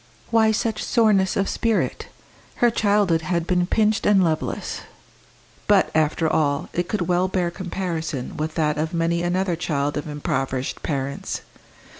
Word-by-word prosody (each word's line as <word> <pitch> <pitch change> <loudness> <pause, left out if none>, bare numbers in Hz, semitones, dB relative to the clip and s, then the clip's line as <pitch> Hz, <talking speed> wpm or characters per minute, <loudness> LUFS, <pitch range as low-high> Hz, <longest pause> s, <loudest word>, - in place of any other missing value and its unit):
Why 220 -1 +4
such 220 0 -1
soreness 205 -5 +3
of 195 - +1
spirit? 230 -2 -1 0.5
Her 240 -1 +3
childhood 205 -6 +2
had 170 0 -1
been 180 0 +1
pinched 215 +1 +2
and 200 -2 +5
loveless; 160 -2 -2 0.9
but, - - +4
after 160 +1 +2
all, 145 -3 0
it 175 0 -2
could 210 - -1
well 180 +2 +1
bear 180 -2 -1
comparison 170 -7 -4
with 155 +1 -3
that 150 -2 +1
of 160 +3 -2
many 170 0 +1
another 180 +1 0
child 145 -4 -1
of 145 - -4
impoverished 135 -3 -2
parents. 140 -2 -3
175 Hz, 145 wpm, -23 LUFS, 155-195 Hz, 0.9 s, and